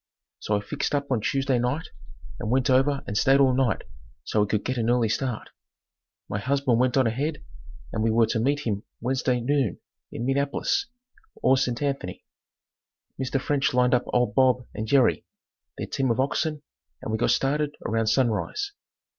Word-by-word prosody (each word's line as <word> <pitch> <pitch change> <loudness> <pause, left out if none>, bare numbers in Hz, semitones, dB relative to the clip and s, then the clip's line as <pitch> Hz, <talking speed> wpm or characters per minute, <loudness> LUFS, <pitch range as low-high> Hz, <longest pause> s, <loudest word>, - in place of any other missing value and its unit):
So 105 - 0
I - - -3
fixed 140 +7 -2
up 140 -1 -2
on 120 -4 +1
Tuesday 135 0 +1
night 125 +7 -1 0.5
and 110 - -3
went 130 +2 +2
over 135 +2 +3
and 100 - -5
stayed 135 +6 +4
all 135 -2 +5
night 130 -2 +1 0.4
so 105 - 0
we 105 - +2
could 105 0 -1
get 130 -1 -1
an 115 0 0
early 120 -2 +2
start. 120 +1 -2 0.8
My 100 - -3
husband 130 0 +1
went 130 +1 +2
on 130 - +4
ahead 140 +7 -2 0.5
and 110 - -1
we 115 - +2
were 115 +1 +4
to 110 +1 -1
meet 140 +5 +1
him 105 -7 -2 0.2
Wednesday 125 0 0
noon 135 -5 0 0.3
in 120 - -4
Minneapolis, 140 +2 0 0.6
or 130 - +5
St. 125 0 -1
Anthony. 135 -11 -3 1.0
Mr. 130 +1 0
French 140 -1 0
lined 125 0 +3
up 125 0 +2
old 120 -4 +1
Bob 125 0 +3
and 110 - -4
Jerry, 130 +1 +3 0.5
their - - -3
team 135 -1 -1
of 115 - 0
oxen 150 +2 -1 0.4
and - - -4
we 110 - -1
got - - +2
started 145 +2 +1
about 115 0 +1
sunrise. 130 - 0
130 Hz, 180 wpm, -25 LUFS, 115-140 Hz, 1.0 s, all